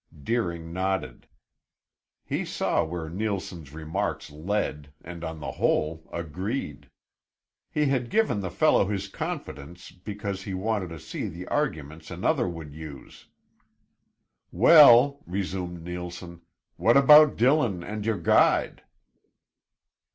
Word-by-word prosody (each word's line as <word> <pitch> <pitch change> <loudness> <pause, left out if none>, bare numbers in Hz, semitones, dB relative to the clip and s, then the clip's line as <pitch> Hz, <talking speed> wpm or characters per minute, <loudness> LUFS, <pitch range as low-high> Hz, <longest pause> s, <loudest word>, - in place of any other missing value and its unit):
Deering 85 - -2
nodded. 95 -9 -3 1.0
He - - -2
saw - - 0
where 80 0 -5
Neilson's 90 -5 -4
remarks 80 -1 -4
led 75 -3 -3
and 85 0 -9
on 80 -1 -5
the - - -5
whole 80 +1 -1
agreed. 85 - -5 0.8
He 150 - 0
had 130 -4 0
given 220 - +1
the 95 -2 -3
fellow 100 - +3
his 100 -1 -3
confidence 85 -3 -7
because 100 +1 -6
he 100 -1 -5
wanted 100 -1 -2
to 85 -1 -8
see - - -5
the 90 +3 -8
arguments 80 - -3
another - - 0
would 80 -4 -8
use. 75 -4 -11 1.2
"Well," 140 - +7
resumed 90 -2 -4
Neilson, 90 0 -7 0.4
"what 115 +3 +4
about 150 +2 +8
Dillon 120 - +2
and 105 +3 -5
your 110 -1 0
guide?" 85 - +2
90 Hz, 115 wpm, -26 LUFS, 80-110 Hz, 1.2 s, about